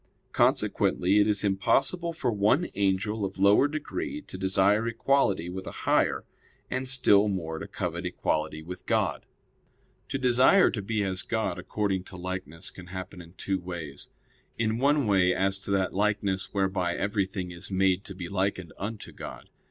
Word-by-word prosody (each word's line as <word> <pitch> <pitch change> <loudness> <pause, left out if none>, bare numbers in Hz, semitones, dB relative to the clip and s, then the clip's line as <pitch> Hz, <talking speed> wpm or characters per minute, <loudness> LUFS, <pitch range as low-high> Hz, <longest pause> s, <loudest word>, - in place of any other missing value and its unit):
Consequently 95 +4 +2
it 105 - +4
is 105 -1 +2
impossible 135 - +1
for 160 -7 -1
one 105 - +2
angel 100 +2 0
of 95 0 -3
lower 100 +8 +5
degree 155 - -4
to - - -10
desire 95 +4 +2
equality 115 -5 +1
with 95 +1 -6
a - - -8
higher; - - +2 0.5
and 130 0 -2
still 105 -6 +4
more 80 -5 -3
to - - -6
covet - - -4
equality 75 0 -2
with 90 +3 -9
God. - - 0 0.8
To - - -1
desire 130 +8 +5
to 105 - -3
be 105 +1 -1
as 95 -1 0
God 110 -6 -2
according 95 0 -1
to 90 - -10
likeness 90 -2 -5
can 90 -2 -12
happen 95 0 -7
in 85 0 -14
two 95 0 -2
ways. 85 -6 -7 0.5
In 110 0 0
one 145 +1 +3
way, 95 -3 +3
as 95 +1 0
to 95 - -8
that 95 -1 +1
likeness 100 -1 0
whereby 95 -3 0
everything 95 -2 -2
is 85 -1 -8
made 95 0 +2
to 95 - -7
be 90 -2 -6
likened 95 -3 -2
unto 105 +2 -5
God. - - -9
95 Hz, 165 wpm, -28 LUFS, 95-110 Hz, 0.8 s, lower